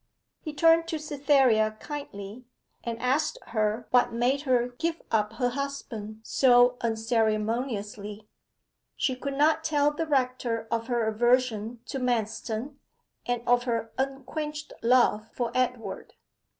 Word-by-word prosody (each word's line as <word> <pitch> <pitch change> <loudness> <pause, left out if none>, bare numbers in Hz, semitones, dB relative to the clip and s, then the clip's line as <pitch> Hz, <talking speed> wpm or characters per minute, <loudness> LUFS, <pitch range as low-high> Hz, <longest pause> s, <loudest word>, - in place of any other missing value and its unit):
He 310 - -6
turned 330 +2 +4
to 330 -1 -2
Cytherea 270 -7 +2
kindly, 240 -6 -7 0.4
and 230 -1 -4
asked 275 +6 +1
her 215 +1 0
what 250 -1 +4
made 245 +4 +1
her 245 -1 +3
give 335 0 -1
up 210 -1 +1
her 245 +2 0
husband 240 -5 -5
so 245 0 +4
unceremoniously. 220 -2 -1 0.7
She 260 - +1
could 275 +2 -4
not 310 +3 +3
tell 295 -2 +2
the 320 +2 -3
rector 255 -5 0
of 230 0 -1
her 240 -3 +1
aversion 235 0 +1
to 270 - -4
Manston, 240 +2 -2 0.5
and 245 -1 -2
of 245 0 +3
her 230 -2 -2
unquenched 300 +3 -4
love 230 -3 +3
for 240 -2 -2
Edward. 250 -2 -2
245 Hz, 125 wpm, -27 LUFS, 225-280 Hz, 0.7 s, turned